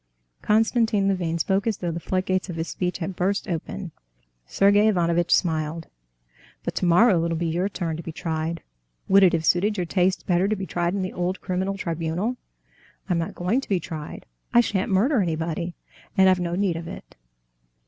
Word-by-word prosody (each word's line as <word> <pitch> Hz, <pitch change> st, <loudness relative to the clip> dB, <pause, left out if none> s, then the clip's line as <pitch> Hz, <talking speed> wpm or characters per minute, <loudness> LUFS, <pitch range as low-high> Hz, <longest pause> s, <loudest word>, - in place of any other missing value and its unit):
Konstantin 220 Hz, -2 st, +2 dB
Levin 175 Hz, -4 st, 0 dB
spoke 195 Hz, +6 st, 0 dB
as 220 Hz, -, 0 dB
though 175 Hz, -2 st, -3 dB
the 165 Hz, -, -4 dB
floodgates 185 Hz, +2 st, -1 dB
of 175 Hz, -, -4 dB
his 165 Hz, 0 st, -3 dB
speech 180 Hz, -1 st, -2 dB
had 180 Hz, +1 st, -4 dB
burst 195 Hz, +4 st, -1 dB
open. 175 Hz, +1 st, -4 dB, 0.6 s
Sergey 205 Hz, +2 st, +4 dB
Ivanovitch 175 Hz, -4 st, +2 dB
smiled. 160 Hz, -1 st, 0 dB, 0.7 s
"But -, -, -3 dB
tomorrow 180 Hz, 0 st, +4 dB
it'll 165 Hz, -1 st, -1 dB
be 170 Hz, -, -2 dB
your 175 Hz, +4 st, 0 dB
turn 170 Hz, -5 st, -3 dB
to -, -, -5 dB
be 165 Hz, -, -6 dB
tried; 160 Hz, 0 st, -3 dB, 0.4 s
would 195 Hz, +1 st, +6 dB
it 185 Hz, -2 st, +6 dB
have 165 Hz, -1 st, 0 dB
suited 205 Hz, +6 st, +2 dB
your 180 Hz, -, -1 dB
tastes 185 Hz, +2 st, +1 dB
better 180 Hz, +1 st, +2 dB
to 215 Hz, -, +1 dB
be 195 Hz, -1 st, -5 dB
tried 175 Hz, 0 st, -1 dB
in 195 Hz, -, -1 dB
the 185 Hz, -, -4 dB
old 180 Hz, +2 st, -2 dB
criminal 190 Hz, +1 st, -2 dB
tribunal?" 170 Hz, +7 st, -2 dB, 0.7 s
"I'm 175 Hz, -2 st, +2 dB
not 170 Hz, +5 st, -4 dB
going 195 Hz, +10 st, 0 dB
to -, -, -12 dB
be 195 Hz, -3 st, +2 dB
tried. 155 Hz, -4 st, -7 dB, 0.3 s
I 240 Hz, -, +6 dB
shan't 205 Hz, -5 st, +1 dB
murder 225 Hz, +6 st, +3 dB
anybody, 170 Hz, 0 st, -2 dB, 0.4 s
and 190 Hz, 0 st, +6 dB
I've 185 Hz, -1 st, +4 dB
no 175 Hz, -1 st, -2 dB
need 185 Hz, -3 st, 0 dB
of 165 Hz, 0 st, -7 dB
it. -, -, -10 dB
180 Hz, 190 wpm, -24 LUFS, 170-195 Hz, 0.7 s, would